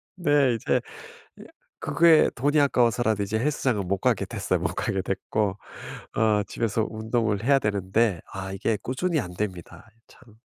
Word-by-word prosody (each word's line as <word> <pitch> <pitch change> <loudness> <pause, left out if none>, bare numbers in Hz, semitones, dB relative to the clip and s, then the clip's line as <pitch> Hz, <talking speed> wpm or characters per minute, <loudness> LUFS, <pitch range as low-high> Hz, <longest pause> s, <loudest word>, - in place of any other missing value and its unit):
네 145 -8 +2
이제 115 - 0 0.6
예 - - -10 0.4
그게 165 -2 +4
돈이 145 +4 +2
아까워서라도 120 -6 +2
이제 110 +3 -2
헬스장은 120 -8 0
못 100 - 0
가게 - - +1
됐어요. - - -2
못 - - -2
가게 95 -1 -1
됐고. 100 +1 -2 0.6
어 105 -1 +2
집에서 110 +1 -1
운동을 110 -1 -1
해야 135 +1 +4
되는데 100 -2 0
아 95 0 -6
이게 105 +2 -1
꾸준히 160 +5 -1
안 90 -7 -5
됩니다. 95 +2 -6 0.2
참. 115 -4 -20
110 Hz, 310 characters per minute, -25 LUFS, 100-130 Hz, 0.6 s, 그게